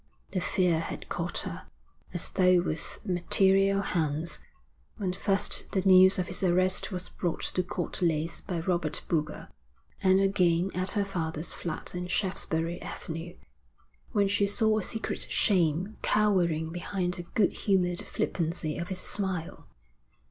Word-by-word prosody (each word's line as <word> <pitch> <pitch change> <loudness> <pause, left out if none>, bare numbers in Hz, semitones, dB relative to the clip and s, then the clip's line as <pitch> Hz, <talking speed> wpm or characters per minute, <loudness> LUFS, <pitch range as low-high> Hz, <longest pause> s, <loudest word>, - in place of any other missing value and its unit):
The 185 - -1
fear 175 -3 +2
had 165 - -6
caught - - -3
her, - - -7 0.4
as 175 - -1
though 185 -1 +4
with 155 -3 -5
material 195 +2 +3
hands, 160 -2 0 0.6
when 190 -5 -2
first 195 +1 0
the 190 - +1
news 190 0 +7
of 185 - 0
his 185 - -2
arrest 185 +2 +2
was 180 -1 -4
brought 175 -3 -3
to 185 - +1
Court 175 0 -4
Leys 165 -1 0
by 175 -4 -2
Robert 170 -3 0
Boulger, 155 -2 -2 0.5
and 190 -1 +4
again 185 -2 +2
at 185 +1 -1
her 200 - +2
father's 165 -4 -3
flat 170 -3 -5
in 180 0 -4
Shaftesbury 175 -3 -1
Avenue, 165 +2 -6 0.8
when 205 -4 +2
she 200 0 +2
saw 215 +1 +2
a - - -3
secret 225 +4 -2
shame 185 +1 +2
cowering 175 -7 +2
behind 175 +1 -2
the 175 -1 -4
good 205 -4 +3
humoured 180 -3 +1
flippancy 165 -2 -2
of 170 - -4
his 190 - -3
smile. 190 -3 -3
180 Hz, 145 wpm, -28 LUFS, 170-195 Hz, 0.8 s, news